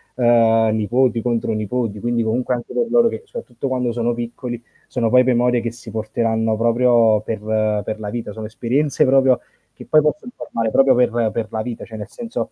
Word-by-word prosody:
ehm, 115 -2 +3
nipoti 120 +2 +1
contro 115 -1 -1
nipoti 110 0 -2
quindi 120 +1 -1
comunque 120 +3 -1
anche 120 -1 -5
per 240 - +1
loro 235 0 +4
che 450 - -7
soprattutto 470 - -7
quando 125 -2 -1
sono 120 0 -1
piccoli 120 0 -6 0.3
sono 115 -3 -1
poi 125 +2 +5
memorie 125 -1 +2
che 115 0 -3
si 115 -1 -12
porteranno 110 +1 -1
proprio 115 -1 +3
per 110 0 -4 0.4
per 110 +2 -5
la 105 -1 -5
vita, 115 -1 -5
sono 110 +1 -7
esperienze 135 +7 0
proprio 130 -1 +4 0.3
che - - -13
poi 155 - +4
possono 200 +11 -2
formare 115 -1 -3
proprio 135 +1 +4
per 120 -2 +2
per 115 -1 -2
la 110 - -2
vita, 120 +1 -6
cioè 110 - -11
nel 105 0 -7
senso 235 0 -5
120 Hz, 190 wpm, -20 LUFS, 110-125 Hz, 0.4 s, poi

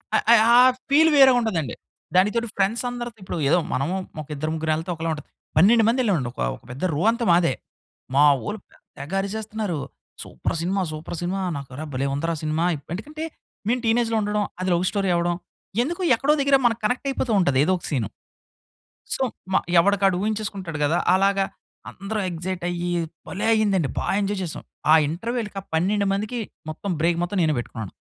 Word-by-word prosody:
అ, - - +6
అ, - - +10 0.2
ఆ - - +8 0.3
ఫీల్ 315 +3 +6
వేరేగా 265 -2 +7
ఉంటది 220 -8 0
అండి. 130 - -5 0.4
దానికితోడు 210 +5 +3
ఫ్రెండ్స్ 200 +5 +1
అందరితో 235 -7 -6
ఏదో 175 +2 +4
మనము 140 +8 0 0.3
ఒక 150 - -11
ఇద్దరు, 155 +2 -3
ముగ్గురెళ్తే 160 +2 -1
ఒకలా 165 +1 -3
ఉంటది. 150 - -8 0.3
12 220 +7 +6
మంది 245 +3 +2
ఎళ్ళామండి 165 - +1
ఒక, - - -16 0.2
ఒక - - -18
పెద్ద 135 +7 -8
రో 155 - -1
అంతా 235 0 -2
మాదే. 170 -5 +4 0.6
మా 145 - +6 0.2
ఓళ్ళు 210 0 -4
పెద్ద - - -26 0.2
తెగ 145 +7 -7
అరిచేస్తున్నారు. 210 -4 -3 0.4
Super - - -4
cinema 190 +3 0
super 155 +3 -6
cinema. 185 +2 -2 0.2
నాకు 140 -2 -8
అరె 155 +3 -5
భలే 135 +2 -1
ఉందిరా 165 +3 -1
సినిమా. 155 +2 0 0.3
ఎందుకంటే 300 - -6 0.4
మేము 250 +2 +2
టీనేజ్‌లో 225 0 +2
ఉండడం. 210 0 0 0.2
అది 185 - -1
లవ్ 175 +1 +1
స్టోరీ 195 -2 -1
అవ్వడం, 175 0 +1 0.5
ఎందుకో 340 +8 -2
ఎక్కడో 280 +6 +2
దగ్గర 280 0 +4
మనకు 230 -1 +2
కనెక్ట్ 250 +5 0
అయిపోతూ 260 -3 -1
ఉంటది, 140 -7 +2
ఏదో 185 +4 +2
ఒక - - -16
సీను. 125 -9 -1 1.1
సో, - - -5 0.3
మ - - +3 0.2
ఎవడికి 200 +3 +2
వాడు 190 -2 +4
ఊహించేసుకుంటాడు 200 -6 -3
గదా! 160 +4 +2 0.2
అలాగా 195 +1 +3 0.5
అందరు 205 +2 -5
ఎక్సైట్ 175 +1 -4
అయ్యి 175 0 -2 0.4
భలే 195 - -3
అయింది 215 -3 +2
అండి. 145 -6 -1
బా - - -1 0.2
ఎంజాయ్ 200 0 -1
చేసాం. 165 - -6 0.3
ఆ - - +9
ఇంటర్వల్‌కి 215 +5 -3
ఆ - - -22
12 200 +5 +1
మందికి 215 +4 -2 0.3
మొత్తం 185 +5 -5
బ్రేక్ 170 +1 +2
మొత్తం 185 +3 -2
నేనే 155 -3 +2
పెట్టుకున్నాను. 110 -4 -6
195 Hz, 180 wpm, -23 LUFS, 165-220 Hz, 1.1 s, అ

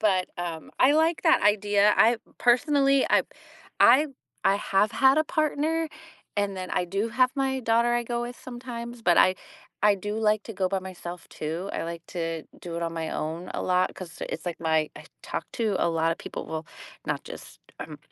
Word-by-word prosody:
but, 190 -4 +2
um, 170 -2 -5
I 265 +3 +6
like 320 +2 +2
that - - +4
idea, 205 0 +4
I 235 +2 +5 0.2
personally 275 +2 +3
I - - +5 0.6
I 270 +6 +7 0.4
I 195 - +4
have 205 +1 +1
had 270 +3 +5
a 310 - +3
partner, 310 +1 0 0.5
and 200 -1 0
then 185 0 -5
I 180 - 0
do 195 +5 -2
have 255 +2 +3
my 265 -1 0
daughter 235 0 +2
I 240 - +1
go 240 0 -2
with 240 0 -6
sometimes, 240 -1 -7
but 175 -5 +4
I 185 - +6 0.5
I 210 -1 +6
do 205 +2 -4
like 215 -1 +2
to 225 - -7
go 185 -1 0
by 195 0 0
myself 180 -2 -8
too, 165 +5 -4
I - - -2
like 170 0 -6
to 165 -3 -3 0.2
do 170 -1 -6
it 170 - -3
on 165 0 -2
my 165 -1 -3
own 165 +4 -4
a - - -2
lot 180 0 +1
'cause 175 -3 -10
it's 165 - -6
like 175 - -3
my 160 -2 +1
I - - -10 0.2
talk - - -4
to 220 -5 0
a - - +2
lot 165 0 +1
of - - -8
people, - - -7
well, 160 0 -5 0.4
not - - -2
just, - - -11 0.2
um, - - -7
205 Hz, 200 wpm, -26 LUFS, 175-240 Hz, 0.6 s, I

